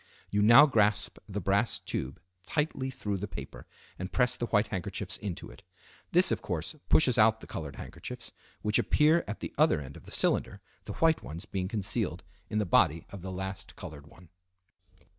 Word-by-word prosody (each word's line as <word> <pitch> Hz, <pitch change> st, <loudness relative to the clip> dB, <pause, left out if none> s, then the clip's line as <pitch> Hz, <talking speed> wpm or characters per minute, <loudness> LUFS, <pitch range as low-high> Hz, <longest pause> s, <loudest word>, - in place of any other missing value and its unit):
You 105 Hz, -, +2 dB
now 120 Hz, +7 st, +9 dB
grasp 105 Hz, -6 st, +1 dB
the 100 Hz, +1 st, -3 dB
brass 100 Hz, +4 st, +1 dB
tube 65 Hz, +1 st, -4 dB, 0.2 s
tightly 140 Hz, +1 st, -1 dB
through 105 Hz, -6 st, -3 dB
the 100 Hz, +2 st, -4 dB
paper -, -, -9 dB, 0.3 s
and 95 Hz, +1 st, -5 dB
press 125 Hz, -1 st, +2 dB
the 120 Hz, -, -3 dB
white 105 Hz, -1 st, +2 dB
handkerchiefs 95 Hz, +1 st, -3 dB
into 100 Hz, -5 st, -6 dB
it. -, -, -15 dB, 0.5 s
This, 180 Hz, +2 st, +5 dB
of -, -, 0 dB
course, 85 Hz, -3 st, -3 dB, 0.2 s
pushes 130 Hz, -7 st, +5 dB
out 110 Hz, +1 st, +5 dB
the -, -, -11 dB
colored 75 Hz, -4 st, -6 dB
handkerchiefs, -, -, -8 dB, 0.3 s
which 105 Hz, 0 st, +2 dB
appear 155 Hz, +3 st, +4 dB
at 105 Hz, -, -5 dB
the -, -, -5 dB
other -, -, +4 dB
end 70 Hz, -1 st, -9 dB
of -, -, -13 dB
the -, -, -12 dB
cylinder, -, -, +1 dB, 0.3 s
the -, -, -5 dB
white 160 Hz, -1 st, +3 dB
ones 85 Hz, +6 st, -8 dB
being 95 Hz, -3 st, -3 dB
concealed 105 Hz, -2 st, -2 dB, 0.3 s
in 105 Hz, -, -2 dB
the 105 Hz, -, +1 dB
body 80 Hz, -2 st, +3 dB
of 100 Hz, -, -8 dB
the 95 Hz, +1 st, -6 dB
last 95 Hz, 0 st, -5 dB
colored 70 Hz, -1 st, -9 dB
one. 85 Hz, +2 st, -17 dB
100 Hz, 185 wpm, -30 LUFS, 90-120 Hz, 0.5 s, now